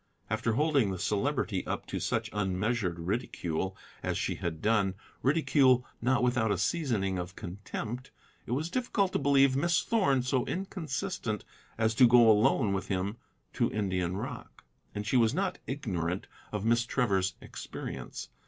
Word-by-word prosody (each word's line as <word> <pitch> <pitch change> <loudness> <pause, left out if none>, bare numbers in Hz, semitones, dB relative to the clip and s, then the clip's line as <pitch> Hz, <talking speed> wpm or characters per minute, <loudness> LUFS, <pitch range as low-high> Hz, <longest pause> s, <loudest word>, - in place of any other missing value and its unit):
After 110 +1 +1
holding 145 -4 +3
the 95 - -3
Celebrity 105 -1 0
up - - -3
to - - -4
such - - -1
unmeasured 100 -1 0
ridicule 95 -1 -2 0.2
as - - -1
she - - -1
had 80 -2 -4
done, 105 -2 +2 0.3
ridicule 135 -3 +4 0.2
not 125 +1 +2
without 120 -3 +2
a 100 - +1
seasoning 100 - 0
of 90 +2 -6
contempt, 105 +6 -6 0.4
it 120 - -1
was 155 +6 -1
difficult 205 -6 0
to - - +1
believe 140 -1 +4
Miss 175 +5 +2
Thorn 180 - +2
so 125 0 +1
inconsistent 180 - -3 0.3
as 110 0 +2
to 125 +2 +7
go 120 -1 +7
alone 105 -1 +3
with 95 - -2
him 100 +3 -2 0.4
to - - +1
Indian 95 -3 -1
rock; - - -7 0.3
and 105 0 -3
she 125 +5 +2
was 115 +2 +3
not 195 +3 -1
ignorant 95 - -2 0.3
of 105 0 -3
Miss 115 +1 +3
Trevor's 100 -7 +1
experience. - - -7
115 Hz, 155 wpm, -30 LUFS, 95-135 Hz, 0.4 s, to